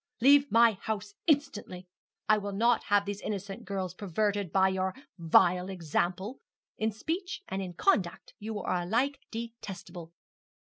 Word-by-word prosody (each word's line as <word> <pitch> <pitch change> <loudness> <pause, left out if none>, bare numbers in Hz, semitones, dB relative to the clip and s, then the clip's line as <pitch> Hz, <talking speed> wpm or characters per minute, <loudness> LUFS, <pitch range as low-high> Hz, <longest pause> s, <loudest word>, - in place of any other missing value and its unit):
Leave 280 +3 +6
my 230 0 +6
house 205 0 -5
instantly. 270 - 0 0.4
I 215 -1 +5
will 200 0 -5
not 235 +4 +2
have 205 0 +3
these 205 0 -4
innocent 200 -1 -5
girls 190 -2 -3
perverted 200 0 -1
by 190 0 +4
your 190 0 -1 0.2
vile 180 +2 +4
example. 185 - -2 0.4
In 220 +1 +1
speech 355 - -4
and 195 - -3
in 185 -2 -5
conduct 180 - +1
you 215 0 -4
are 180 -2 -1
alike 245 +10 0
detestable.' 195 -7 -7
200 Hz, 140 wpm, -30 LUFS, 185-225 Hz, 0.4 s, Leave